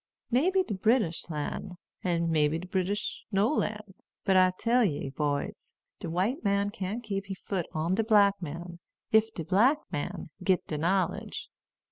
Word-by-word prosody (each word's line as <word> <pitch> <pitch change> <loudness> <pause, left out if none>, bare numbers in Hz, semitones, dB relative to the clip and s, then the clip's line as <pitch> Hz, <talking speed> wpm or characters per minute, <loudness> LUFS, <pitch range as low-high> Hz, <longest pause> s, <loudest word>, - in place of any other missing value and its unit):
May 265 +9 +4
be 380 0 +3
de 220 - -4
British 205 -4 +1
lan', 160 +4 -4 0.3
and 170 -2 +1
may 155 -2 +4
be 155 +2 -1
de 170 - -7
British 190 +3 -2
no 205 +7 +3
lan'. 210 -7 -2 0.3
But 190 - +3
I 185 0 +6
tell 240 +1 +3
ye, 145 -8 -1
boys, 145 0 -3 0.2
de - - -5
white 195 - 0
man 200 0 +1
can't 210 +2 -4
keep 195 -3 -3
he 195 - -4
foot 185 -2 -3
on 165 +2 0
de 225 +4 +2
black 205 -3 +4
man, 170 +2 -6 0.3
ef 220 0 +5
de 165 - -4
black 230 - +4
man 145 +1 -4
git 185 -1 +2
de 150 - -3
knowledge. 185 +3 -1
190 Hz, 175 wpm, -29 LUFS, 170-215 Hz, 0.3 s, I